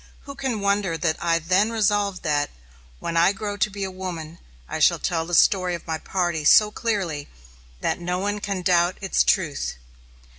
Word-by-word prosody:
Who 280 Hz, -, -9 dB
can 265 Hz, -6 st, -3 dB
wonder 200 Hz, -4 st, 0 dB
that 160 Hz, -1 st, -1 dB
I 165 Hz, -1 st, +2 dB
then 185 Hz, +7 st, +1 dB
resolved 205 Hz, -3 st, 0 dB
that, 145 Hz, -1 st, 0 dB, 0.5 s
"When 170 Hz, -, -4 dB
I 170 Hz, +4 st, +4 dB
grow 205 Hz, 0 st, -4 dB
to 210 Hz, -, +1 dB
be 200 Hz, 0 st, -5 dB
a 190 Hz, -, -3 dB
woman 170 Hz, -3 st, -7 dB, 0.3 s
I -, -, -4 dB
shall -, -, +4 dB
tell 165 Hz, -2 st, -2 dB
the 175 Hz, -, 0 dB
story 185 Hz, 0 st, +4 dB
of 170 Hz, -, -10 dB
my 160 Hz, -1 st, -3 dB
party 175 Hz, -4 st, -1 dB
so 210 Hz, +8 st, +6 dB
clearly 190 Hz, -11 st, -2 dB, 0.5 s
that -, -, -1 dB
no 180 Hz, +1 st, -2 dB
one 205 Hz, +2 st, -2 dB
can 200 Hz, -3 st, -3 dB
doubt 175 Hz, 0 st, +2 dB
its 195 Hz, -, +1 dB
truth"? 155 Hz, -, 0 dB
185 Hz, 185 wpm, -23 LUFS, 170-205 Hz, 0.5 s, so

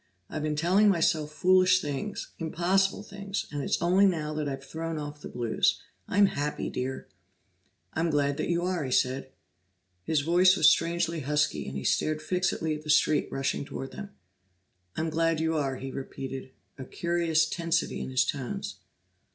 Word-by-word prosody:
I've 155 Hz, -, -3 dB
been 150 Hz, 0 st, -1 dB
telling 185 Hz, +7 st, +4 dB
myself 165 Hz, -4 st, +1 dB
foolish 185 Hz, +2 st, +4 dB
things, 150 Hz, +5 st, -4 dB
impossible 185 Hz, +5 st, +1 dB
things, 200 Hz, -1 st, -5 dB
and 145 Hz, -1 st, -3 dB
it's -, -, 0 dB
only 185 Hz, +3 st, +5 dB
now 155 Hz, -5 st, -1 dB
that 150 Hz, -1 st, -2 dB
I've 135 Hz, 0 st, -5 dB
thrown 160 Hz, +3 st, -5 dB
off 145 Hz, 0 st, -6 dB
the -, -, -7 dB
blues. 120 Hz, -2 st, +1 dB, 0.3 s
I'm 200 Hz, +1 st, +4 dB
happy, 150 Hz, -5 st, -2 dB
Dear!" 130 Hz, +1 st, -4 dB, 0.9 s
"I'm 165 Hz, +1 st, 0 dB
glad 145 Hz, -1 st, +1 dB
you 170 Hz, +2 st, 0 dB
are," 180 Hz, -3 st, -1 dB
he 130 Hz, -, -3 dB
said. 130 Hz, +1 st, +1 dB, 0.7 s
His 155 Hz, -, +1 dB
voice 180 Hz, +5 st, +5 dB
was -, -, +6 dB
strangely 170 Hz, 0 st, +2 dB
husky, 150 Hz, -, 0 dB
and 65 Hz, 0 st, -5 dB
he 65 Hz, -, -5 dB
stared 155 Hz, 0 st, +1 dB
fixedly 180 Hz, -3 st, 0 dB
at 150 Hz, 0 st, -6 dB
the 155 Hz, -, -10 dB
street 150 Hz, 0 st, +3 dB
rushing 135 Hz, +1 st, -1 dB
toward 135 Hz, -1 st, -6 dB
them. 200 Hz, -1 st, -8 dB, 0.9 s
"I'm 160 Hz, 0 st, -1 dB
glad 165 Hz, 0 st, +1 dB
you 160 Hz, 0 st, 0 dB
are," 140 Hz, -3 st, 0 dB
he 135 Hz, +1 st, -6 dB
repeated, 135 Hz, -1 st, -6 dB, 0.3 s
a 130 Hz, -, -6 dB
curious 170 Hz, 0 st, +1 dB
tensity 165 Hz, 0 st, -1 dB
in -, -, -4 dB
his 130 Hz, 0 st, +2 dB
tones. 130 Hz, -4 st, -4 dB
160 Hz, 165 wpm, -28 LUFS, 140-175 Hz, 0.9 s, was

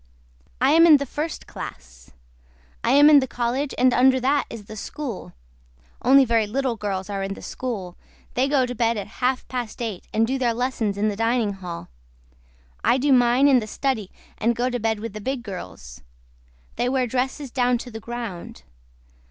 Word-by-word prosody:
I 265 Hz, +2 st, +4 dB
AM 330 Hz, +2 st, +7 dB
IN 305 Hz, -3 st, +8 dB
THE 280 Hz, -, -3 dB
FIRST 300 Hz, +4 st, -4 dB
CLASS. 65 Hz, 0 st, -10 dB, 0.7 s
I -, -, +1 dB
AM 290 Hz, +1 st, +7 dB
IN 300 Hz, -2 st, +8 dB
THE 265 Hz, -, -2 dB
COLLEGE 250 Hz, +4 st, -2 dB
AND 255 Hz, 0 st, +4 dB
UNDER 260 Hz, +1 st, +4 dB
THAT 275 Hz, +3 st, +1 dB
IS 225 Hz, -3 st, -9 dB
THE 215 Hz, -, -9 dB
SCHOOL. 225 Hz, -, -6 dB, 0.7 s
ONLY 270 Hz, +2 st, +6 dB
VERY 225 Hz, -3 st, +2 dB
LITTLE 260 Hz, +2 st, -1 dB
GIRLS 195 Hz, -3 st, -3 dB
ARE 195 Hz, -1 st, -2 dB
IN 195 Hz, 0 st, -3 dB
THE -, -, -11 dB
SCHOOL 205 Hz, -9 st, -5 dB, 0.4 s
THEY 255 Hz, +2 st, +1 dB
GO 275 Hz, -2 st, +2 dB
TO 245 Hz, -, -5 dB
BED 230 Hz, -1 st, +1 dB
AT 205 Hz, -, -4 dB
HALF 255 Hz, +1 st, 0 dB
PAST 245 Hz, -4 st, -5 dB
EIGHT 220 Hz, -6 st, -5 dB
AND 225 Hz, +1 st, +2 dB
DO 265 Hz, +3 st, -2 dB
THEIR 240 Hz, -3 st, +1 dB
LESSONS 235 Hz, -5 st, -1 dB
IN 215 Hz, +1 st, +1 dB
THE 205 Hz, -, -3 dB
DINING 225 Hz, -1 st, +1 dB
HALL. 180 Hz, -3 st, -7 dB, 1.0 s
I 245 Hz, -, +4 dB
DO 275 Hz, +1 st, +3 dB
MINE 245 Hz, +2 st, +4 dB
IN 265 Hz, -3 st, +5 dB
THE 215 Hz, -, -6 dB
STUDY 225 Hz, -5 st, -2 dB, 0.3 s
AND 235 Hz, +2 st, +1 dB
GO 245 Hz, +2 st, 0 dB
TO 245 Hz, -, -2 dB
BED 220 Hz, -1 st, 0 dB
WITH 225 Hz, -2 st, -5 dB
THE 215 Hz, -, -7 dB
BIG 260 Hz, +2 st, -3 dB
GIRLS. 90 Hz, -, -9 dB, 0.8 s
THEY 245 Hz, -, +1 dB
WEAR 260 Hz, -1 st, +1 dB
DRESSES 260 Hz, +2 st, -2 dB
DOWN 245 Hz, -1 st, +2 dB
TO 245 Hz, +1 st, -9 dB
THE 225 Hz, -, -7 dB
GROUND. 230 Hz, -6 st, -7 dB
240 Hz, 195 wpm, -23 LUFS, 215-260 Hz, 1.0 s, IN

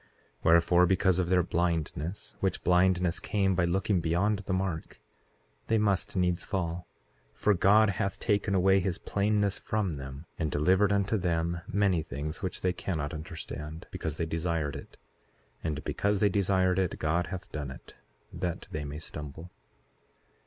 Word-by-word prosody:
Wherefore, 85 Hz, +2 st, +5 dB
because 95 Hz, 0 st, +3 dB
of 90 Hz, -2 st, 0 dB
their 90 Hz, -1 st, +4 dB
blindness, 85 Hz, +1 st, -2 dB
which 95 Hz, -, -1 dB
blindness 90 Hz, -1 st, +3 dB
came 95 Hz, -2 st, +1 dB
by 90 Hz, -1 st, +2 dB
looking 95 Hz, +2 st, +1 dB
beyond 90 Hz, +6 st, +1 dB
the 100 Hz, -1 st, -5 dB
mark, 95 Hz, -4 st, -2 dB, 0.7 s
they 115 Hz, -, +3 dB
must 100 Hz, -3 st, +1 dB
needs 90 Hz, -1 st, +1 dB
fall; 90 Hz, -2 st, -3 dB, 0.5 s
for 105 Hz, -, +3 dB
God 100 Hz, +3 st, +5 dB
hath 95 Hz, +1 st, -2 dB
taken 100 Hz, -2 st, +1 dB
away 95 Hz, +1 st, +5 dB
his 90 Hz, 0 st, -1 dB
plainness 100 Hz, -1 st, 0 dB
from 100 Hz, -8 st, -1 dB
them, 70 Hz, +3 st, -8 dB
and 80 Hz, -2 st, 0 dB
delivered 95 Hz, +8 st, +3 dB
unto 100 Hz, +2 st, +2 dB
them 85 Hz, -1 st, 0 dB
many 100 Hz, -5 st, +2 dB
things 75 Hz, 0 st, -5 dB
which 95 Hz, -2 st, -4 dB
they 90 Hz, -1 st, +1 dB
cannot 80 Hz, -5 st, -3 dB
understand, 80 Hz, -1 st, -7 dB
because 80 Hz, -2 st, -4 dB
they 85 Hz, -, 0 dB
desired 80 Hz, -2 st, -1 dB
it. -, -, -10 dB, 0.7 s
And 75 Hz, -1 st, -2 dB
because 100 Hz, 0 st, 0 dB
they 105 Hz, +1 st, +3 dB
desired 95 Hz, -1 st, +2 dB
it 95 Hz, -3 st, 0 dB
God 85 Hz, +3 st, 0 dB
hath 95 Hz, -2 st, -7 dB
done 75 Hz, -3 st, -4 dB
it, 65 Hz, -, -11 dB, 0.4 s
that 90 Hz, 0 st, -3 dB
they 75 Hz, -4 st, -3 dB
may 70 Hz, +1 st, -6 dB
stumble. 80 Hz, +2 st, -8 dB
90 Hz, 155 wpm, -29 LUFS, 80-95 Hz, 0.7 s, Wherefore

